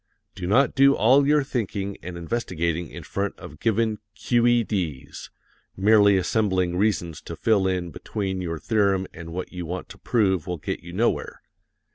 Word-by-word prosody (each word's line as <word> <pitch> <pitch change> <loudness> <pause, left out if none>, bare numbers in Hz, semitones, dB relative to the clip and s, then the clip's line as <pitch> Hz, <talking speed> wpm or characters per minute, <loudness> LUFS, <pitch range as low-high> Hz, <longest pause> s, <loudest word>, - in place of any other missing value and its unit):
Do 90 -3 -5
not 125 +8 +3
do 140 0 +5
all 135 +6 +4
your 150 -1 +4
thinking 100 -7 -3
and 90 0 -7
investigating 85 -4 -2
in - - -9
front 100 0 -3
of 75 - -11
given 110 0 +1 0.2
"Q.E.D.'s;" 115 - 0 0.5
merely 100 0 +5
assembling 95 -2 +1
reasons 90 -5 0
to - - -7
fill 105 -4 +2
in 90 -2 -2
between 95 -1 -4
your 85 -2 -3
theorem 100 +2 +1
and 85 0 -9
what 90 +3 -5
you 90 -2 -5
want 90 +2 -5
to 100 0 -12
prove 95 - +1
will 90 -1 -3
get - - -4
you 85 - -11
nowhere. 110 +7 -1
95 Hz, 160 wpm, -24 LUFS, 90-110 Hz, 0.5 s, do